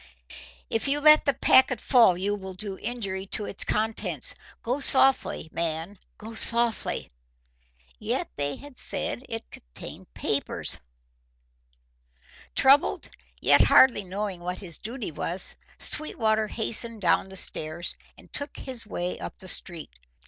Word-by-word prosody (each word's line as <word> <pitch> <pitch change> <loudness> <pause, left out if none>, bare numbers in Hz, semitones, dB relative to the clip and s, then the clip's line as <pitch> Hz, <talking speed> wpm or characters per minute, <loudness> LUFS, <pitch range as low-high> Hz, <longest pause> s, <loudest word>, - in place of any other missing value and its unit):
"If 225 - -2
you 285 +1 +2
let 305 +1 +5
the 280 - +2
packet 255 -2 +3
fall 230 -9 +4
you 200 +3 -2
will 190 -2 -8
do 195 0 -7
injury 195 -5 -4
to 210 - -2
its 200 - 0
contents. 220 +1 -3 0.3
Go 250 +4 -2
softly, 270 - +6
man, 170 +4 -4 0.2
go 220 +1 -10
softly!" 235 0 +4 0.9
Yet - - -3
they 145 0 -3
had 285 -3 -14
said - - -1
it 225 0 -5 0.4
held - - -10
papers! - - -1 1.8
Troubled, 275 +2 +2 0.3
yet - - +4
hardly 245 -6 +5
knowing 190 -1 -5
what 180 +1 -5
his 170 -5 -9
duty 230 -3 -5
was, 170 +4 -3 0.2
Sweetwater 220 -7 -1
hastened 230 +1 -3
down 180 - +2
the 190 0 -13
stairs, 160 -1 -3 0.2
and - - -19
took 285 0 -2
his 245 -4 -7
way 180 -3 -4
up - - -8
the 190 - -12
street. 170 -3 +4
215 Hz, 135 wpm, -25 LUFS, 185-245 Hz, 1.8 s, softly